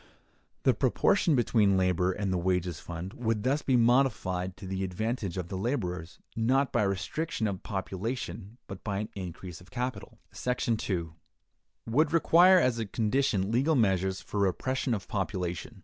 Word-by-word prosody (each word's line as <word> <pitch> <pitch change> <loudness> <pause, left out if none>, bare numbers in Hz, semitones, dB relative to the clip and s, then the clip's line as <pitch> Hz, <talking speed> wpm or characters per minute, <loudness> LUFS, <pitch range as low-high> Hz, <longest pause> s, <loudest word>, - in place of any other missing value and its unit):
The - - +5
proportion 170 -6 +2
between 105 -5 +3
labor 90 0 +2
and 95 -1 -2
the - - +1
wages 90 -2 0
fund 85 +3 -7
would 115 -3 -1
thus 140 +4 +1
be 130 -2 +2
modified 110 -7 +2
to 95 - -9
the 95 0 -3
advantage 100 0 -3
of 90 -2 -4
the - - -4
laborers, 90 - -3 0.2
not 130 +4 +2
by - - +3
restriction 105 - -1
of 100 -3 -2
population, 100 +1 -4
but 95 -1 -9
by 100 -2 -2
an 105 +1 -3
increase 90 -2 -7
of 90 - -17
capital. 125 +1 -4 0.2
§ 125 -2 -1
2. 85 -5 -3 0.7
—Would 150 +7 +2
Require 175 +3 +6
as 125 -7 +1
a 110 - -2
Condition 110 -2 0
Legal 135 +7 +2
Measures 95 -5 +1
for 105 - -4
Repression 125 +6 0
of 100 - -7
Population. 95 +1 -3
100 Hz, 160 wpm, -29 LUFS, 95-125 Hz, 0.7 s, Require